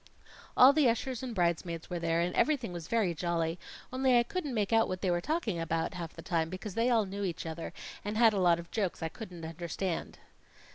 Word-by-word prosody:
"All 260 +2 +9
the 285 -4 +4
ushers 240 +1 -2
and 250 -3 -5
bridesmaids 170 -2 0
were 175 - -3
there, 165 0 +1
and 175 +1 0
everything 265 -10 +1
was 170 -2 -6
very 220 -7 +1
jolly, 170 0 -1 0.3
only 260 -1 +4
I 240 - +5
couldn't 290 -1 -4
make 210 0 0
out 225 0 +5
what 185 -1 -4
they 185 - +1
were 175 0 +1
talking 230 - -1
about 165 +2 -1
half 170 -3 -6
the - - -10
time, 165 -2 0
because 185 +2 -6
they 230 +4 +2
all 225 -4 +3
knew 200 +1 -5
each 175 -4 -3
other 165 0 -5 0.3
and 210 +1 -3
had 225 -2 +6
a 200 - 0
lot 175 -2 +4
of 170 0 -9
jokes 195 -6 -2
I 160 - -1
couldn't 180 -5 -8
understand." 170 +2 -4
185 Hz, 225 wpm, -31 LUFS, 170-230 Hz, 0.3 s, All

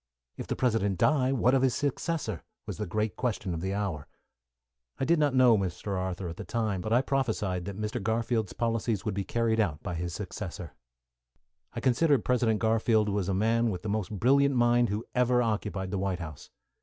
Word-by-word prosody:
"If - - -7
the - - -2
President 110 -6 +1
die, 135 - +3
what 125 -1 +3
of 135 - +4
his 130 -2 +2
successor?" 145 - -2 0.2
was - - -6
the 105 - -2
great 105 +2 -1
question 110 -7 -2
of 80 - -4
the 95 +2 -2
hour. 95 -8 -3 0.9
I 135 - 0
did 170 +2 +3
not 145 -3 +2
know 125 -4 +6
Mr. 95 +1 -3
Arthur 95 0 -3
at 85 0 -7
that - - -8
time, 110 -5 -1
but 110 - -4
I 125 +3 +4
prophesied 105 -10 -1
that 100 0 -6
Mr. 105 0 -3
Garfield's 110 0 -1
policies 115 -3 -1
would 105 - -1
be 100 0 -2
carried 115 +1 0
out 80 -9 0
by 90 - -4
his 85 0 -4
successor. 90 -6 -6 1.0
I - - -4
consider 140 +4 +3
President 120 -4 +1
Garfield 110 -1 +2
was 100 -2 -1
a 95 - +1
man 115 +3 +2
with 90 -4 -4
the 105 - -3
most 105 -2 -1
brilliant 135 +6 +3
mind 120 0 +3
who 105 +3 -3
ever 125 0 +3
occupied 105 -4 -2
the 100 - -1
White 95 -1 -1
House. 80 -5 -9
110 Hz, 200 wpm, -29 LUFS, 95-120 Hz, 1.0 s, know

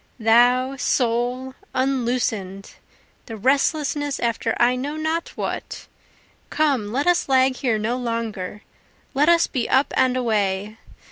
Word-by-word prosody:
Thou, 245 +4 +3
soul, 250 +1 0 0.2
unloosen'd 240 -7 -1 0.6
the 225 - -7
restlessness 285 +4 0
after 230 -1 -1
I 245 +1 +4
know 280 +4 -4
not 320 +2 -2
what; - - -5 0.6
Come, 275 -9 0
let 275 +5 -1
us 355 -4 +2
lag 260 -1 +3
here 240 -5 0
no 225 +4 -1
longer, 225 -5 -4 0.5
let 290 +4 +3
us 340 -1 +5
be 250 -5 -3
up 265 +2 +2
and 255 -1 +2
away! 210 -3 -1
250 Hz, 125 wpm, -22 LUFS, 225-275 Hz, 0.6 s, us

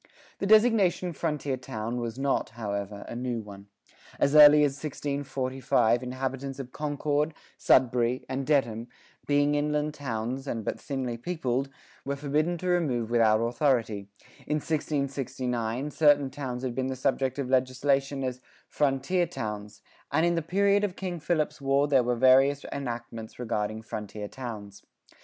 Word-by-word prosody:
The 195 - -1
designation 210 -5 +4
"frontier 150 -4 -2
town" 120 -2 -4
was 115 0 -4
not, 135 0 0
however, 100 -2 -4
a - - -6
new 120 -1 -2
one. 100 -2 -10 0.5
As 140 - +2
early 150 0 +9
as 145 - +3
1645 135 -4 0
inhabitants 130 +1 -4
of 130 -2 -7
Concord, 150 +1 -1 0.2
Sudbury, 125 0 +3
and 130 +1 -2
Dedham, 120 -6 +1 0.4
"being 145 0 +3
inland 150 +1 0
townes 130 -1 -4
& 110 - -5
but - - -3
thinly 130 -4 -3
peopled," 135 -2 -2 0.3
were 140 +1 -2
forbidden 150 +5 0
to 185 - -5
remove 135 -11 0
without 110 -2 +4
authority;[40:1] 115 -5 -2
in 150 - +1
1669, 135 -4 -2
certain 145 -3 +4
towns 130 -3 -5
had 125 -2 -2
been 130 +1 -1
the 130 - -3
subject 130 0 0
of 140 -3 -2
legislation 135 +1 +1
as 125 -1 -3 0.3
"frontier 145 +5 +1
towns;"[40:2] 105 -1 -6 0.3
and 160 +3 +3
in 175 - +2
the 165 - 0
period 200 +5 +2
of 195 -3 -1
King 180 -3 -4
Philip's 155 -2 -1
War 140 +1 +2
there 135 -3 +4
were 120 0 0
various 135 +3 +4
enactments 120 -4 -6
regarding 110 -2 -2
frontier 105 -1 -6
towns. 105 -5 -8
135 Hz, 145 wpm, -28 LUFS, 120-145 Hz, 0.5 s, early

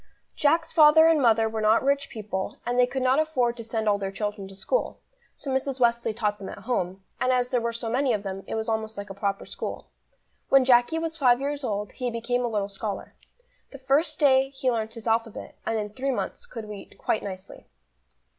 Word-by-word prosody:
JACK'S 325 +3 +2
father 315 0 +7
and 325 -3 +4
mother 225 -2 +4
were 220 0 -3
not 215 +3 +4
rich 280 +1 +1
people, 205 -3 -4
and 245 +1 0
they 250 - +5
could 260 0 -3
not 260 +3 +3
afford 255 -7 +1
to 230 - -6
send 220 -1 -3
all 205 -1 +3
their 195 -1 -3
children 205 0 -4
to 195 - -12
school, - - -1 0.4
so 275 - -6
Mrs. 265 0 -1
Wesley 235 -1 +2
taught 210 -2 -1
them 195 - -7
at - - -8
home, 190 -6 -2 0.2
and 255 - +2
as 250 -1 +1
there 245 - +2
were 235 0 -1
so 230 0 -4
many 255 +3 +1
of 210 -3 -1
them 195 -1 -5
it - - -3
was 220 +1 -2
almost 220 -1 -2
like 200 0 -6
a - - -5
proper 200 0 -2
school. - - -6 0.6
When 270 -1 +6
Jacky 245 +5 +4
was 325 0 -3
five 250 -5 +4
years 285 +1 -3
old, 210 -3 -2
he 250 -1 -3
became 240 +1 -1
a - - +1
little 205 -3 -1
scholar. 200 0 -5 0.6
The 275 - -10
first 285 +4 +1
day 270 -2 +4
he 265 -2 -1
learnt 225 -1 -3
his 230 0 -8
alphabet, 225 -1 -1
and 225 - 0
in 210 -1 -3
three 265 +5 -3
months 275 - -3
could 225 - -8
read 205 -2 -10
quite 215 - -1
nicely. 190 -1 -9
235 Hz, 220 wpm, -26 LUFS, 210-265 Hz, 0.6 s, father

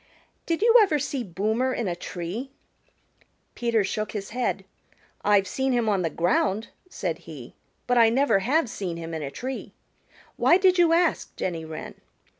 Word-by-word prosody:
Did 335 +4 0
you 460 +1 +5
ever 380 -8 +3
see 275 -2 -3
Boomer 220 +7 -1
in 230 - -2
a 175 - -1
tree?" 180 +8 -5 1.0
Peter 235 -3 +1
shook 215 +2 -3
his 200 -2 -5
head. 235 -5 -2 0.6
"I've 205 -2 +3
seen 265 +4 -1
him 240 -2 +1
on 200 -3 +2
the 165 - 0
ground," 190 +6 0 0.2
said 170 - -3
he, 135 -7 -10 0.3
"but 245 -1 +3
I 225 -1 +7
never 260 -3 +3
have 265 +8 +1
seen 190 -7 -5
him 165 0 -6
in 160 - -3
a 140 - -4
tree. 260 - -6 0.6
Why 345 - +5
did 370 -1 +3
you 340 -2 +5
ask, 335 0 +1
Jenny 165 -3 -3
Wren?" 160 -1 -7
220 Hz, 170 wpm, -25 LUFS, 180-265 Hz, 1.0 s, I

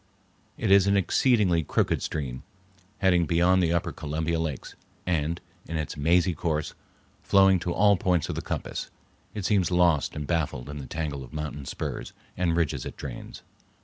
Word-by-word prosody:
It - - 0
is 100 -1 +6
an 100 0 +4
exceedingly 100 -3 +3
crooked 75 - 0
stream, 65 -5 -4 0.6
heading 90 -3 +3
beyond 90 +3 +3
the 85 -2 +2
upper 85 -1 0
Columbia 80 +2 -2
lakes, 80 -5 -4 0.3
and, 85 -1 0 0.3
in 80 - -3
its 80 -2 -3
mazy 85 +4 +3
course, 80 -3 -2 0.5
flowing 95 -1 +5
to 85 - -3
all 100 +2 +4
points 90 -3 +1
of - - -3
the - - -3
compass, - - -4 0.5
it 105 -3 -4
seems 100 -4 +2
lost 85 -6 +2
and 75 - -4
baffled 75 -6 -2
in 75 0 -6
the 65 - -7
tangle 75 -2 -4
of 65 - -13
mountain 75 -2 -5
spurs - - -5 0.2
and 85 -2 +1
ridges 85 -4 0
it - - -7
drains. - - -8
85 Hz, 170 wpm, -27 LUFS, 75-90 Hz, 0.6 s, is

